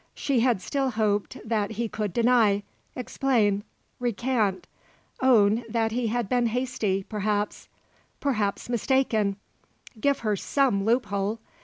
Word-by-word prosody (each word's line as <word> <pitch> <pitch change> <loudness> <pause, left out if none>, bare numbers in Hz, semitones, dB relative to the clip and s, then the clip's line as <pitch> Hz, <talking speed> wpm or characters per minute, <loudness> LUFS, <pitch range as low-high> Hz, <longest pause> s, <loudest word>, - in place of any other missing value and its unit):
She 275 -4 0
had 235 -6 +2
still 275 -2 0
hoped 210 -3 0
that 220 -1 0
he 230 +2 -2
could 210 -2 -3
deny, 225 -2 +3 0.3
explain, 230 -5 +1 0.4
recant, 235 -4 0 0.6
own 230 -3 +4
that 225 0 0
he 240 +1 -1
had 235 0 -1
been 245 +2 +2
hasty, 225 -5 -1
perhaps; 210 0 -2 0.5
perhaps 215 -8 -1
mistaken; 235 -4 +1 0.6
give 280 +5 +1
her 215 -2 +1
some 200 -2 +1
loophole. 215 -2 0
225 Hz, 120 wpm, -26 LUFS, 205-250 Hz, 0.6 s, own